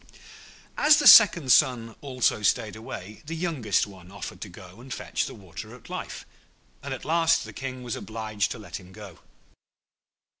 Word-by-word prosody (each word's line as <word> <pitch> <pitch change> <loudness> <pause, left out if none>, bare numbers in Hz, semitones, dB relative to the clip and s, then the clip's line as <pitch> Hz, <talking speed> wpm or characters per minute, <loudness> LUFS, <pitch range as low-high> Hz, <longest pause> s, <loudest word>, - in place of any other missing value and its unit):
As 300 0 +6
the 300 - 0
second 170 - +8
son 115 -3 +3
also 130 -5 0
stayed 105 +1 0
away, 105 -2 -9
the 165 - -4
youngest 155 - 0
one 95 -3 -14
offered 100 - -8
to 105 - -7
go 90 +3 -14
and 130 +1 -13
fetch - - -3
the - - -9
Water 100 +4 -10
of 125 - -15
Life, - - -6 0.6
and 140 - -7
at 130 - -6
last 165 +1 +2
the - - -10
King 130 -1 -6
was 120 -2 -4
obliged 110 -2 -3
to - - -10
let 100 -6 -8
him 90 0 -16
go. 100 -5 -12
115 Hz, 175 wpm, -26 LUFS, 100-135 Hz, 0.6 s, second